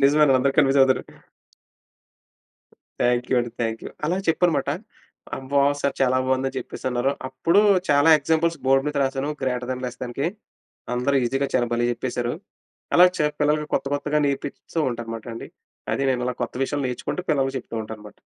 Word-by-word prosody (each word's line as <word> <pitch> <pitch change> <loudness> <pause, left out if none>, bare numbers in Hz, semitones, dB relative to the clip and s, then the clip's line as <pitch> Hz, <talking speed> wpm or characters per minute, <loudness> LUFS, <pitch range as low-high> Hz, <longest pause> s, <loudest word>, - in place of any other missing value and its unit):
నిజమేనండి. 140 -1 +5
అందరు 135 +1 +1
కన్ఫ్యూజ్ 140 -1 +5
అవుతారు. 130 -1 +4 2.0
థాంక్యూ 125 +1 +1
అండి 120 - -4
థాంక్యూ. 115 0 -3 0.2
అలా 180 +3 0
చెప్పనమాట 165 0 +2 0.7
"అమ్మో! 140 +1 +1 0.2
సార్ 140 - 0
చాలా 130 0 +3
బాగుంది" 130 0 +1
అని - - -12
చెప్పేసి - - -7
అన్నారు. 125 +3 +1 0.2
అప్పుడు 150 +9 +2 0.3
చాలా 145 +3 +5
ఎగ్జాంపుల్స్ 160 +2 +1
బోర్డ్ 135 +1 +4
మీద 145 - -5
రాసాను 135 +2 -2
గ్రేటర్ 125 -1 -1
దెన్, 130 0 -6
లెస్ 125 0 -7
దెన్‌కి 125 +5 -3 0.7
అందరు 135 +3 +1
ఈజీ‌గా 135 +3 0
చాలా 120 -1 +3
భలే 120 0 +1
చెప్పేసారు. 120 +1 -3 0.6
అలా 180 - +8
చా 150 - +3
పిల్లలకి 150 +1 +2
కొత్త - - 0
కొత్తగా 150 +1 0
నేర్పిస్తూ 140 +3 -4
ఉంటా, 120 - -5
అన్నమాట 115 0 -7
అండి. - - -7 0.5
అది 140 - -1
నేను 125 -1 0
అలా 125 - -1
కొత్త 120 - -4
విషయాలు 140 0 -1
నేర్చుకుంటూ, 125 +8 -3
పిల్లలకి 135 -2 +1
చెప్తూ 115 - -10
ఉంటా 110 - -8
అన్నమాట. 105 0 -13
135 Hz, 165 wpm, -23 LUFS, 125-145 Hz, 2.0 s, అలా